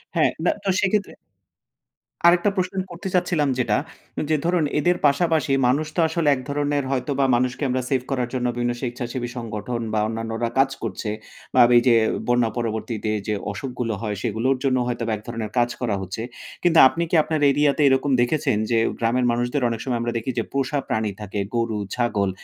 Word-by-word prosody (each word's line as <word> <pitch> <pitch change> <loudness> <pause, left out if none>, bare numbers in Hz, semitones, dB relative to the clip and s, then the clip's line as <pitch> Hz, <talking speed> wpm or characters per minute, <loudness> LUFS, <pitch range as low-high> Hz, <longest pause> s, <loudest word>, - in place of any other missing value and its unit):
হ্যাঁ, - - +4 0.3
তো 195 - -1
সেক্ষেত্রে 205 +1 0 1.1
আরেকটা 175 +3 +5
প্রশ্ন 185 +1 -1 0.2
করতে 175 +2 -6
চাচ্ছিলাম 160 -5 +1
যেটা 125 - +2 0.5
যে, 155 - +3
ধরুন 175 -2 +2 0.2
এদের 175 +4 +2
পাশাপাশি 155 0 +1
মানুষ 145 +5 +1
তো - - -1
আসলে 160 -1 -1
এক - - -6
ধরনের 145 0 0
হয়তো 130 +1 -1
বা 135 - +4
মানুষকে 125 +3 -1
আমরা 130 0 0
সেভ 135 -2 +1
করার 125 -3 -1
জন্য 125 -1 -1
বিভিন্ন 120 0 0
স্বেচ্ছাসেবী 120 0 -4
সংগঠন 115 +1 -4
বা 110 - +2
অন্যান্যরা 115 +1 -3
কাজ 135 - +5
করছে 105 0 -4 0.4
বা - - +6 0.2
এই - - +6
যে 120 - +6 0.3
বন্যা 120 -2 +3
পরবর্তীতে 110 -1 -2 0.2
যে, 105 - 0 0.2
অসুখগুলো 120 +1 -4
হয় 105 -2 -2
সেগুলোর 120 +4 0
জন্য 130 -1 +2
হয়তো 120 -1 -2
বা 110 - 0
এক 105 - -9
ধরণের 115 -3 -4
কাজ 120 0 +3
করা 115 -5 0
হচ্ছে। 95 +3 -5 0.4
কিন্তু 170 -2 +5
আপনি 165 +5 -2
কি - - +1
আপনার 155 0 -1
এরিয়া 145 +1 +3
তে - - +1
এরকম 135 +1 +2
দেখেছেন 135 -1 +1
যে, 115 - +3 0.2
গ্রামের 120 +2 +1
মানুষদের 120 +3 -1
অনেক 115 - -3
সময় 125 -3 -1
আমরা 120 0 -2
দেখি 115 +3 -3
যে, - - 0
পোষা 140 +1 0
প্রাণী 110 -2 -1
থাকে, 105 0 -4 0.2
গরু, 115 -2 0 0.2
ছাগল 105 -5 0
125 Hz, 185 wpm, -23 LUFS, 115-145 Hz, 1.1 s, বা